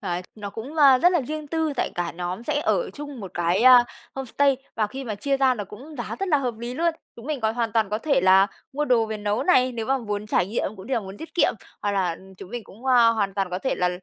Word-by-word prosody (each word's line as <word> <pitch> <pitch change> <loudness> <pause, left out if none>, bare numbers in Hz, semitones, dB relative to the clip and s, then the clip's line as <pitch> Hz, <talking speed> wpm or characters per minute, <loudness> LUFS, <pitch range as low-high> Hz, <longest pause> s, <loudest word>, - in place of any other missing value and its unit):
à, 175 +1 -3
nó 205 -2 -7
cũng, 245 +9 -8
ơ, 275 -4 +7
rất 355 +4 +4
là 345 - +3
riêng 305 +3 -5
tư, 320 0 -1
tại - - 0
cả 175 0 -2
nhóm 180 +5 -4
sẽ 295 +2 -1
ở - - 0
chung 290 -4 -8
một 190 -3 -7
cái 175 +5 +1 0.5
homestay 270 +1 +1 0.2
và 215 -2 +1
khi 265 +5 -7
mà 220 -4 -3
chia 275 +7 0
ra 265 -1 +3
nó 210 -4 -5
cũng 260 +11 -12
giá 240 - -4
rất 390 - -1
là 300 - +4
hợp 245 -5 -3
lý 240 +2 -5
luôn. 335 +2 +1 0.2
Chúng 235 +2 -11
mình 300 -3 -2
còn 220 0 0
hoàn 230 -2 -1
toàn 220 -3 +1
có 215 - 0
thể 280 - +1
là 190 +1 +6 0.3
mua 295 +2 -1
đồ 235 -4 +3
về 220 - -4
nấu 210 +3 -1
này, 255 -6 +3
nếu 225 -2 -4
mà 270 0 +1
muốn 210 -2 -4
trải 185 - +1
nghiệm 215 0 -1
cũng 190 +2 -11
như 265 - -1
là 230 - +1
muốn 195 -1 -9
tiết 320 +5 -10
kiệm, 350 - +3 0.3
hoặc 205 - 0
là 180 -4 0 0.2
chúng 185 - -10
mình 240 -2 -5
cũng, 230 +7 -13
a, 240 -3 +6
hoàn 205 -4 0
toàn 195 -2 -1
có 180 - -2
thể 265 - -1
là, 180 - +1
235 Hz, 280 wpm, -24 LUFS, 205-275 Hz, 0.5 s, ơ